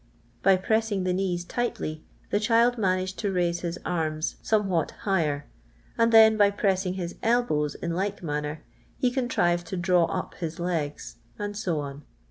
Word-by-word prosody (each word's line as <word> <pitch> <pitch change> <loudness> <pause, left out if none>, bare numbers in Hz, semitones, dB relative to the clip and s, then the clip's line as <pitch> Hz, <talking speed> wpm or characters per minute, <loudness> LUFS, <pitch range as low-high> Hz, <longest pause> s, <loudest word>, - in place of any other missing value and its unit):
By 195 0 +5
pressing 220 0 0
the 185 0 +1
knees 180 -2 -1
tightly 165 -9 -3 0.3
the 205 - +2
child 230 +3 +3
managed 185 -3 0
to 205 -3 -1
raise 175 -2 0
his 170 0 -4
arms 155 -2 -1
some 210 -2 +1
what 170 -5 0 0.2
higher, 155 -8 +1 0.5
and 230 0 +3
then 220 -1 +7
by 205 -1 +6
pressing 190 -2 0
his 175 -2 -4
elbows 225 -11 +1
in 170 - -4
like 195 +2 -2
manner 150 -1 -3 0.3
he 250 - +1
contrived 175 -10 +1
to 190 - -4
draw 180 -1 +3
up 180 +2 -4
his 165 -2 -5
legs, 165 -4 -3 0.2
and 205 0 -4
so 175 -7 -1
on. 140 0 -7
185 Hz, 165 wpm, -26 LUFS, 170-205 Hz, 0.5 s, then